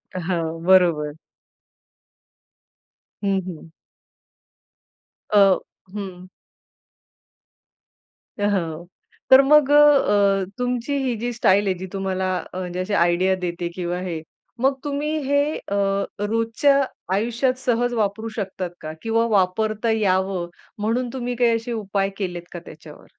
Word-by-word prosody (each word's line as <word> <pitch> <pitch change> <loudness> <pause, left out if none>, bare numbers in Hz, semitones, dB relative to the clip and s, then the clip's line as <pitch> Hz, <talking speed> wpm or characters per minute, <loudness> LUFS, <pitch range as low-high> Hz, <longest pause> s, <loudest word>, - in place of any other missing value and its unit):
हां, 175 -1 -1 0.2
बरोबर. 170 -6 +4 2.1
हं, 195 -1 +1
हं. 165 -2 -9 1.6
अ 210 - +3 0.6
हं. 185 -3 -7 2.1
अ, - - -1
हो. 170 -3 -2 0.4
तर 265 +1 +9
मग 295 0 +5
अ, - - +6 0.7
अ, - - -4
तुमची 250 +2 -2
ही 250 -3 0
जी 240 +2 -3
स्टाईल 205 -3 +3
आहे 190 - +2
जी 190 +1 -6
तुम्हाला 190 -1 -1 0.2
अ, - - -6
म्हणजे 180 0 -4
अशी 185 +3 -3
आयडिया 180 +1 +3
देते 175 0 -3
किंवा 175 -1 -3
हे, 170 -4 -4 0.4
मग 270 +2 +3
तुम्ही 295 +2 -2
हे 285 0 +3 0.2
अ, 200 - -7 0.5
रोजच्या 230 +6 +2 0.3
आयुष्यात 235 +5 +1
सहज 245 0 0
वापरू 220 0 -1
शकतात 190 -4 -4
का? 155 0 -6
किंवा 230 0 +1
वापरता 215 +3 +1
यावं 190 -4 0 0.3
म्हणून 235 +4 -1
तुम्ही 245 -1 -3
काही 235 -1 +3
असे 230 +2 -4
उपाय 200 -3 -1
केलेत 175 -3 -4
का 175 - -5
त्याच्यावर? 155 -1 -13
200 Hz, 120 wpm, -22 LUFS, 180-235 Hz, 2.1 s, तर